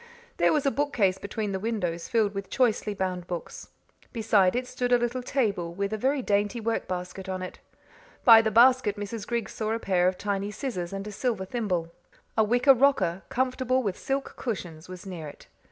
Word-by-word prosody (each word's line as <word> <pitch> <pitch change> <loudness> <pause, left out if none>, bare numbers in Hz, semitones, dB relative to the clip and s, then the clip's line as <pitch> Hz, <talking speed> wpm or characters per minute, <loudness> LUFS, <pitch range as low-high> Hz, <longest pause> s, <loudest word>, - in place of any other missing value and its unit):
There - - +4
was 300 -2 +1
a 275 - +3
bookcase 225 -11 +1
between 205 +1 -3
the 190 - -2
windows 185 -6 -2
filled 220 -3 +1
with 195 -1 -5
choicely 220 -4 +1
bound 185 -2 -3
books. 175 -2 -6 0.4
Beside 210 -5 +3
it 250 +1 -1
stood 250 -1 -3
a 245 - +7
little 240 +1 -2
table 200 -10 -1
with 200 +2 -2
a - - -1
very 265 +3 +1
dainty 205 +2 +1
work 225 0 -2
basket 185 +1 -5
on 185 0 -3
it. 185 - -8 0.7
By 225 -2 +10
the 220 - 0
basket 240 -1 +5
Mrs. 205 +1 -5
Griggs 235 -1 -2
saw 220 0 -2
a 225 - -1
pair 180 -4 +2
of 185 0 0
tiny 200 0 -2
scissors 210 -5 -4
and 195 0 -5
a 210 - -6
silver 215 -2 -2
thimble. 185 -7 -2 0.4
A 220 - +4
wicker 245 +5 +5
rocker, 255 -9 +2
comfortable 255 0 0
with 200 -4 -1
silk 270 0 -3
cushions, 180 -8 -5
was 185 0 -9
near 175 -5 -6
it. 145 - -12
210 Hz, 195 wpm, -27 LUFS, 185-245 Hz, 0.7 s, By